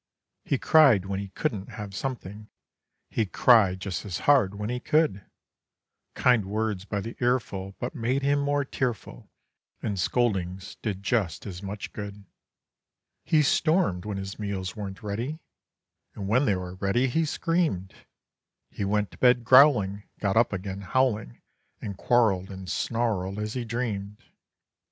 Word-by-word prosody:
He 140 - 0
cried 130 -11 +5
when 95 0 -3
he 100 - -5
couldn't 105 -2 -3
have 105 -2 -7
something; 105 -3 -5 0.6
He 110 - 0
cried 95 -1 +4
just 95 -3 -3
as 95 -5 -4
hard 125 -9 +4
when 105 +3 -3
he 125 - -2
could; 150 -10 +1 0.9
Kind 120 -5 +3
words 105 -1 -2
by 105 -1 -2
the 115 +3 -7
earful 100 -6 -1
but 120 - -4
made 130 +1 -1
him 145 +1 +2
more 145 0 0
tearful, 125 -5 -4 0.5
And 100 -3 -3
scoldings 95 -3 -1
did 100 -3 -3
just 105 -6 0
as 95 -3 -7
much 100 +1 -6
good. 100 -1 -7 1.0
He 155 -1 +3
stormed 155 - +2
when 105 -2 -3
his 95 +1 -6
meals 100 -2 -3
weren't 100 -2 -7
ready, 115 +9 -3 0.8
And 100 - -5
when 125 +7 +3
they 105 - +2
were 90 -1 -5
ready, 100 +7 +1
he 160 +6 +1
screamed. 155 - -1 0.8
He - - -4
went 105 +1 0
to - - -16
bed 125 -1 +4
growling, 120 -6 +6 0.2
got 100 -2 0
up 115 +1 +4
again 100 0 -4
howling 105 - 0 0.4
And 100 - -5
quarreled 100 -5 +2
and 95 -1 -8
snarled 105 -4 -1
as 105 0 -3
he 125 -2 -3
dreamed. 105 -4 -3
105 Hz, 150 wpm, -27 LUFS, 95-125 Hz, 1.0 s, growling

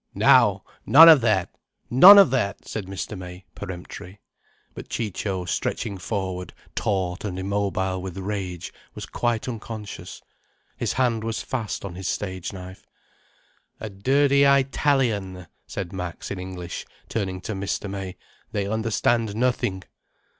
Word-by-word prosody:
"Now! - - +5 0.2
None 160 +4 +9
of 155 -5 +8
that! 105 -6 +1 0.4
None 185 +12 +10
of 195 -10 +7
that!" 120 -7 -1
said 105 -4 -5
Mr. 95 +2 -5
May, 90 0 -9
peremptory. 95 0 -8 0.5
But - - -10
Ciccio, 95 -3 -3
stretching 95 +2 -3
forward 95 -3 -4 0.2
taut 95 -3 -2
and 95 -4 -4
immobile 95 -1 -1
with 95 0 -7
rage, 95 -3 -5 0.2
was - - -6
quite 120 -1 -2
unconscious. 110 -3 -7 0.6
His - - -2
hand 120 -4 +1
was 115 0 -3
fast 115 -6 -4
on 95 - -6
his 95 +1 -6
stage 95 -3 -3
knife. 95 -1 -10 0.9
"A 110 - -6
dirty 140 +8 +2
Eyetalian," 130 -9 +1 0.2
said 95 -3 -5
Max, 90 -3 -6
in 100 - -4
English, 90 -1 -6 0.2
turning 95 -4 -3
to 110 - -4
Mr. 100 +1 -3
May. 95 -2 -6 0.4
"They 100 -1 -1
understand 110 +1 0
nothing." 110 -6 0
100 Hz, 130 wpm, -24 LUFS, 95-115 Hz, 0.9 s, None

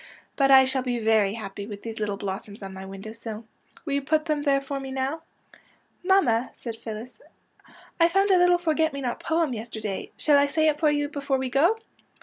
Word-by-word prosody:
But 275 -1 +3
I 265 -1 +8
shall 265 0 +1
be 250 -1 -2
very 220 -3 +2
happy 200 -2 -7
with 205 -2 -8
these 225 -1 -6
little 205 -2 -2
blossoms 200 +1 -6
on 195 0 -7
my 190 0 -8
window 195 +2 -8
sill. 225 -1 -8 0.4
Will 285 - -2
you 280 - +1
put 310 +3 +1
them 305 -2 0
there 280 -2 +2
for 275 0 -5
me 270 0 -7
now? 265 +4 -2 0.3
" - - -26
" - - -41
Mamma," 355 - +3
said 230 -2 -6
Phyllis, 225 - -8 0.4
'' - - -24
I 335 - +7
found 390 +3 +2
a 375 - +6
little 355 0 +5
forget 320 -2 +1
me 280 - -5
not 245 -2 -3
poem 320 -4 0
yesterday. 220 -3 -5
Shall 290 -2 +4
I 285 - +3
say 315 +2 +1
it 300 -1 -1
for 310 - +4
you 290 0 0
before 280 -2 -1
we 260 -1 -3
go? 340 - +3
265 Hz, 225 wpm, -25 LUFS, 220-300 Hz, 0.4 s, I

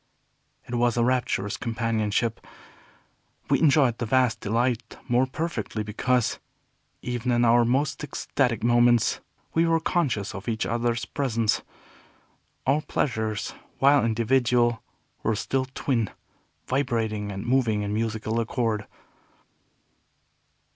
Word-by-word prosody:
It 120 - -7
was 120 -1 +2
a 120 - +3
rapturous 120 -5 0
companionship. 115 -1 -1 1.1
We - - +4
enjoyed 140 -6 +4
the 120 - -2
vast 125 -1 +2
delight 115 +1 -1
more 125 +1 +3
perfectly 130 -7 -3
because, 120 +3 0 0.6
even 125 0 -2
in 120 0 +3
our 120 +1 +5
most 135 +6 0
ecstatic 130 -5 -1
moments, 120 -1 +4 0.3
we 165 +1 +3
were 165 0 +3
conscious 145 - -1
of 100 +3 -8
each 110 -1 -1
other's 120 0 -1
presence. 115 -6 0 1.0
Our 140 +3 +2
pleasures, 110 -8 -2 0.2
while 140 +1 +5
individual, 120 +1 +2 0.4
were 110 - 0
still 130 +5 -1
twin, 130 -4 -1 0.6
vibrating 115 -6 -1
and 100 +2 -6
moving 120 -4 +2
in 100 0 -3
musical 110 0 -1
accord. 115 -2 -1
120 Hz, 115 wpm, -26 LUFS, 110-130 Hz, 1.1 s, our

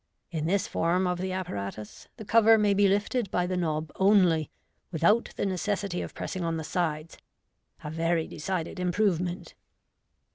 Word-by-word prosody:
In 160 -2 -2
this 195 +2 +1
form 175 +3 +1
of 180 0 -1
the 185 +1 -2
apparatus 105 - -6
the 220 - -8
cover 225 +1 +6
may 210 -2 +3
be 200 0 +4
lifted 205 +3 0
by 180 -1 0
the 185 +1 -2
knob 155 -3 -2
only, 185 -6 +4 0.4
without 185 +8 +2
the - - -1
necessity 195 0 -2
of - - -7
pressing 185 - -4
on 165 -1 -1
the 160 - -4
sides 155 -1 -3 0.3
— - - -32
a 150 - -5
very 165 0 0
decided 180 +2 -4
improvement. 180 -1 -1
180 Hz, 160 wpm, -28 LUFS, 165-200 Hz, 0.4 s, cover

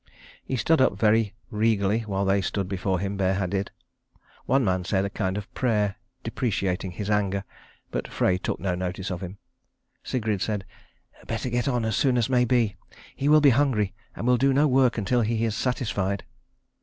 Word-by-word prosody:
He 130 - -3
stood 145 +6 +3
up 115 -6 +3
very 110 0 +2 0.2
regally 105 -1 +2
while 100 -3 -2
they 95 +1 +2
stood 95 +1 -2
before 95 0 -1
him 100 +1 -3
bareheaded. 95 0 0 0.8
One 135 0 +3
man 95 -2 +1
said 95 +2 0
a 100 - -4
kind 95 -1 -2
of 105 - -3
a - - -26
prayer, 105 -5 0 0.3
deprecating 95 -5 -2
his 105 +3 -3
anger; 100 -1 +1 0.5
but - - -3
Frey 90 0 +1
took - - -3
no 95 -2 -1
notice 90 +1 -3
of 90 - -4
him. 95 +1 -7 0.7
Sigrid 110 -6 -1
said, 105 -3 -2 0.6
"Better 115 +2 -3
get 120 -1 0
on 120 -4 0
as 110 -2 0
soon 130 -3 +3
as 120 +1 +1
may 125 -1 +4
be. 115 -4 +1 0.4
He 140 - 0
will 155 0 +7
be 145 -2 +7
hungry, 120 -7 +2 0.2
and - - -5
will 125 0 +4
do 135 +2 +3
no 145 +3 +4
work 130 -3 +3
until 120 +4 +1
he 115 +1 0
is 110 -2 -1
satisfied." 100 -6 -1
105 Hz, 185 wpm, -26 LUFS, 95-120 Hz, 0.8 s, will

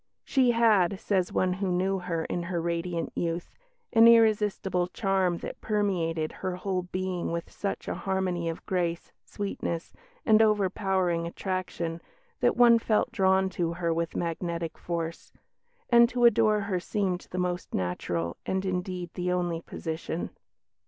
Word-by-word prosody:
She 260 -3 +3
had, 215 -6 +3
says 190 -3 0
one 185 -1 +1
who 190 0 -2
knew 190 +2 +1
her 170 -2 -2
in 175 - -2
her 170 0 -2
radiant 170 0 -2
youth, 170 0 -3 0.4
"an 225 -1 +8
irresistible 210 -5 +3
charm 190 -3 0
that - - -7
permeated 175 -7 0
her 185 -1 -4
whole 185 0 -2
being 180 -1 -3
with 170 0 -4
such 200 - -4
a - - -1
harmony 185 -3 -1
of 165 - -6
grace, 175 -3 -2
sweetness, 185 -4 -4 0.3
and 220 -1 +6
overpowering 190 -5 +1
attraction 170 -2 -3 0.4
that - - +2
one 235 -1 +7
felt 220 -1 +1
drawn 190 -1 +3
to 170 -2 -1
her 170 -1 -1
with 165 0 -2
magnetic 170 0 -3
force; 165 -1 -5 0.6
and 235 0 +7
to 245 -1 +2
adore 215 -2 +4
her 200 -2 -1
seemed 185 -1 -2
the 180 - -6
most 180 -1 -2
natural 85 -2 -2
and 190 0 -1
indeed 180 -1 -3
the 180 0 -2
only 175 -2 -1
position." 160 +1 -5
180 Hz, 145 wpm, -28 LUFS, 170-200 Hz, 0.6 s, an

